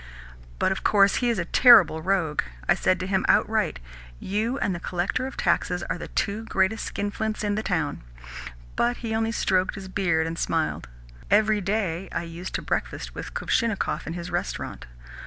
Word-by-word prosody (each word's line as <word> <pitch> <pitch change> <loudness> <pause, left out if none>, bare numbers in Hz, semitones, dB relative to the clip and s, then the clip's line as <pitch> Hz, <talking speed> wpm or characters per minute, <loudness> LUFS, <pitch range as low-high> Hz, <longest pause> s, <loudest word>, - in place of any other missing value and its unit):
But - - +1
of 190 - -3
course 200 -1 +4
he 245 - +1
is 230 - +1
a 175 - -1
terrible 200 - +6
rogue. 175 -4 +1 0.3
I - - +6
said 185 - +1
to - - -2
him 190 0 0
outright: - - +2 0.4
'You 220 +6 -1
and 200 - 0
the 175 - -4
Collector 180 +9 -2
of 265 - -9
Taxes 180 -1 +1
are 175 - -3
the - - -6
two 205 +3 -2
greatest 195 +2 0
skinflints 215 +2 -3
in 205 -1 0
the 215 - -1
town.' 160 -8 -1 0.7
But 240 +1 +1
he 220 - -2
only 225 0 0
stroked 185 -4 +1
his 195 -2 -7
beard 175 -4 +1
and 165 +1 -4
smiled. 160 - -1 0.4
Every 215 0 +3
day 195 -3 -1
I - - -2
used 170 +2 -7
to - - -3
breakfast - - -3
with - - -8
Kuvshinnikov 230 -5 -1
in 160 - -3
his 175 +1 -6
restaurant. 175 - -4
195 Hz, 180 wpm, -25 LUFS, 175-215 Hz, 0.7 s, terrible